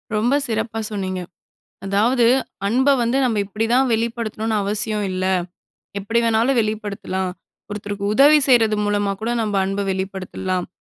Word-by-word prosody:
ரொம்ப 235 +6 +2
சிறப்பா 225 -1 -2
சொன்னீங்க. 190 -3 -3 0.6
அதாவது, 225 +5 +2 0.4
அன்ப 260 +6 +2
வந்து 235 +3 +1
நம்ம 230 -4 +1
இப்பிடி 215 +3 -2
தான் 265 +1 +3
வெளிப்படுத்தணுனு 225 -1 -2
அவசியம் 210 +1 -1
இல்ல. 185 0 -2 0.7
எப்பிடி 225 +4 0
வேணாலும் 230 +3 +2
வெளிப்படுத்தலாம். 205 -3 -3 0.4
ஒருத்தருக்கு 205 -1 -5
உதவி 290 +5 +7
செய்றது 225 -4 +4
மூலமா 205 -1 0
கூட 225 +2 -2
நம்ம 215 -2 -2
அன்ப 195 +1 -2
வெளிப்படுத்தலாம். 190 -1 -3
215 Hz, 130 wpm, -21 LUFS, 200-230 Hz, 0.7 s, உதவி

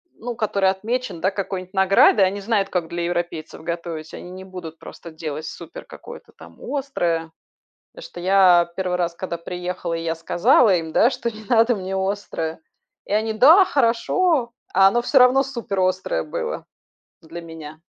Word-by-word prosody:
ну, 240 0 -6
который 200 -4 +1
отмечен, 210 -2 -4
да, 190 - +2
какой-нибудь 190 -1 -5
наградой, 190 +1 +5
они 200 +2 -2
знают, 200 -2 0
как 175 -3 -2
для 170 0 -3
европейцев 170 -3 -4
готовить, 170 -2 -5
они 180 - -10
не 185 0 -9
будут 175 -4 -9
просто 170 - -11
делать 155 -1 -6
супер - - -9
какое-то - - -12
там - - -15
острое. 175 - -2 0.6
Потому - - -12
что 175 - -10
я 180 -2 +4
1 185 -2 -1
раз, 175 -1 -1
когда 170 0 -5
приехала, 180 0 -5
и 165 - -3
я 165 0 -1
сказала 190 +6 +3
им, 160 -2 -4
да, 240 - +4
что 235 -3 -3
не 220 0 -12
надо 230 +2 +3
мне 190 0 -5
острое. 190 -5 -3 0.5
И - - -6
они: 220 +1 0
"Да, 320 - +7
хорошо". 250 +2 +1 0.2
А 195 +1 +6
оно 240 +4 0
всё 270 - +3
равно 255 +2 +5
суперострое 190 - -2
было - - -4 0.6
для 165 +1 -9
меня. 160 -2 -10
190 Hz, 165 wpm, -22 LUFS, 170-225 Hz, 0.6 s, Да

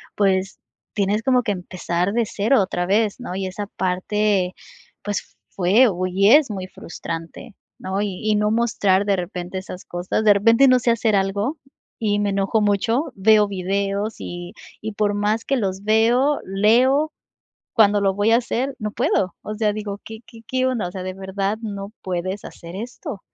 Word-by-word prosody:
pues, 195 -1 +1 0.3
tienes 205 +1 0
como 250 -1 +3
que 210 - 0
empezar 180 0 -2
de 235 0 +2
cero 215 +3 +2
otra 180 -1 -1
vez, 210 +3 +1
¿no? 215 -7 -6
Y 190 -1 -2
esa 200 +2 -5
parte, 185 +1 0 0.5
pues 205 -1 -4 0.2
fue 200 +7 +4
u 185 -1 -2
y 195 +3 +3
es 295 -3 +6
muy 190 -2 -5
frustrante, 165 +4 -8 0.3
¿no? 190 +1 -2
Y 200 -3 -3
y - - +3
no 210 0 +2
mostrar 205 -4 +2
de 200 -2 +2
repente 180 +1 -5
esas 185 -1 -9
cosas. 175 +5 -2
De 210 - +8
repente 230 +6 +5
no 255 0 +5
sé 235 0 +2
hacer 225 -2 +1
algo 200 +9 -1 0.4
y 205 -2 +1
me 205 -1 +1
enojo 195 +3 +1
mucho, 225 +8 +1
veo 210 +1 +5
videos 200 +2 -2
y 175 0 -7 0.3
y 215 0 -5
por 205 -1 +1
más 210 +2 0
que 275 - +1
los 195 -3 -2
veo, 235 +7 +3
leo, 250 +10 +3 0.6
cuando 210 -3 +5
lo 195 -1 +2
voy 205 +3 +2
a 230 - +7
hacer 255 +2 -2
no 210 -2 -4
puedo. 185 -2 0
O 215 - -5
sea, 210 -1 +1
digo: 205 -1 -5
"¿Qué 220 0 -9
qué 225 - -14
qué 255 +1 +1
onda? 235 -8 -1
O 180 - -10
sea, 190 - -5
de 185 - -3
verdad 195 +2 -3
no 200 -1 -6
puedes 185 +2 -3
hacer 170 +1 -10
esto". 240 - -7
205 Hz, 185 wpm, -22 LUFS, 190-225 Hz, 0.6 s, De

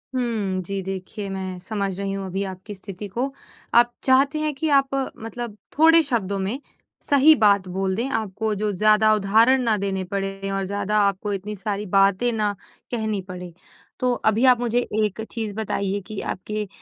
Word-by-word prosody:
हुँ, 215 -7 -1
जी 195 +2 -3
देखिए, 195 +2 -5
मैं 190 -1 -4
समझ 200 -1 -3
रही 195 0 -2
हूँ 195 0 -4
अभी 190 +1 -2
आपकी 190 +3 -9
स्थिति 195 +1 -8
को। 245 +8 -2 0.4
आप 240 0 +6
चाहते 275 +3 +3
हैं 305 -1 0
कि 310 +3 -1
आप 275 0 -3 0.3
मतलब 225 -1 -6 0.2
थोड़े 325 +1 +7
शब्दों 200 -7 -1
में 200 +8 -2 0.4
सही 285 +2 +6
बात 200 -5 +3
बोल 190 +1 -1
दें, 240 +6 -2
आपको 220 -2 -2
जो 210 +1 -1
ज़्यादा 215 +2 +4
उदाहरण 220 +6 +4
ना 225 -2 +2
देने 190 -1 -2
पड़े 195 0 -3
और 195 0 -1
ज़्यादा 205 +2 -1
आपको 200 +1 -2
इतनी 205 +2 -4
सारी 205 +1 -3
बातें 195 +4 +3
ना 210 -2 0 0.4
कहनी 220 -4 -1
पड़े। 180 -1 -8 0.5
तो 250 0 +2
अभी 220 +4 +3
आप 250 -2 +6
मुझे 240 0 +1 0.3
एक 210 +1 -4
चीज़ 220 -3 -3
बताइए 200 -2 -1
कि 215 -2 -5
आपके 210 +2 -4
210 Hz, 175 wpm, -23 LUFS, 195-235 Hz, 0.5 s, थोड़े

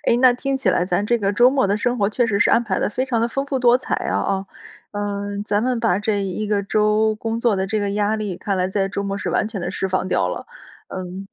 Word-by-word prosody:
哎， 235 - +3
那 255 -1 +7
听 270 +2 -2
起 225 -8 +1
来 180 - +1
咱 180 +2 0
这 235 +1 +2
个 200 -1 0
周 245 +4 +5
末 265 -5 +2
的 200 +2 +1
生 245 +3 0
活 200 - +2
确 235 +3 +1
实 200 -2 0
是 - - +4
安 235 - +4
排 195 -5 -1
得 - - 0
非 255 +5 -2
常 235 -3 0
地 235 - +1
丰 275 +4 -2
富 275 -2 -1
多 245 -1 +5
彩 255 - -2
啊 - - -1
哦。 195 0 -1 0.5
嗯， 205 0 -3
咱 210 0 0
们 250 -2 0
把 215 -5 +2
这 210 -1 0
一 195 +2 -3
个 205 -1 0
周 215 +1 +2
工 225 +1 -3
作 230 -5 +2
的 190 0 -1
这 215 +1 -1
个 200 -1 -1
压 205 +1 +1
力， 205 -4 -3
看 195 +1 -2
来 185 0 0
在 195 0 0
周 200 0 -3
末 200 0 -3
是 - - -4
完 215 - +1
全 205 -5 -5
地 175 - -3
释 195 -1 -2
放 185 0 -1
掉 - - +1
了， - - -5 0.4
嗯。 185 +1 -6
210 Hz, 300 characters per minute, -21 LUFS, 195-230 Hz, 0.5 s, 那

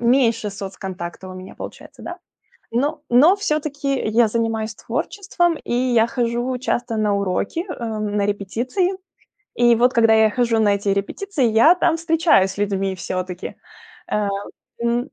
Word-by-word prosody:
Меньше 235 -3 +2
соцконтакта 190 -2 -7
у 185 - -8
меня 185 0 -10
получается, - - -10
да? - - -7 0.5
Но 285 +7 0
но 295 +11 +6
всё-таки 300 -7 -1
я 225 +2 +4
занимаюсь 225 -1 -1
творчеством, 350 - -1
и - - -4
я 240 -2 +3
хожу 240 +1 -1
часто 245 -2 -2
на 210 -1 +1
уроки, 200 - -1
эм, 215 - -3
на 200 -1 +1
репетиции. 230 - -1 0.7
И 240 0 +6
вот 245 +2 +3
когда 225 -2 +4
я 220 -1 +5
хожу 235 0 +1
на 210 -2 +4
эти 200 0 -3
репетиции, 280 - -2
я 230 +10 +6
там 350 -2 +2
встречаюсь 325 - +3
с 195 - -13
людьми 195 -1 -1
всё-таки. 185 0 -5 0.6
Э, 210 -1 +1 0.6
м, 235 0 +2
230 Hz, 145 wpm, -21 LUFS, 205-260 Hz, 0.7 s, но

